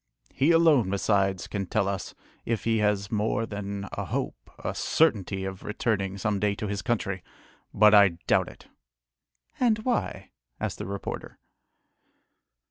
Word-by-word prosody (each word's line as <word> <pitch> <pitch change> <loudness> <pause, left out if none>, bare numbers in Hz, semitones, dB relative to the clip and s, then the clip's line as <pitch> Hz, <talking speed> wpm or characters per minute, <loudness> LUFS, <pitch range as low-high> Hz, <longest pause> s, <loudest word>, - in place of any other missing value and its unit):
He 140 +4 +2
alone 160 - +5
besides 95 -1 +1
can 100 -2 -4
tell 100 +1 +1
us, 100 -1 -4 0.3
if 115 -2 -2
he 115 -1 +2
has 105 -2 +1
more 110 +1 0
than 100 -1 -5
a - - -3
hope, - - -4
a - - -2
certainty, 100 - +1
of 95 -1 -6
returning 105 -3 -1
some 100 0 -1
day 100 0 +1
to 105 - -4
his 100 -1 -2
country, 105 -6 -1 0.5
but 105 0 +6
I 100 -5 +6
doubt - - +3
it!" - - -15 0.9
"And 235 -4 +3
why?" 100 - -2 0.3
asked - - -3
the - - -4
reporter. 100 0 -6
100 Hz, 145 wpm, -27 LUFS, 100-115 Hz, 0.9 s, but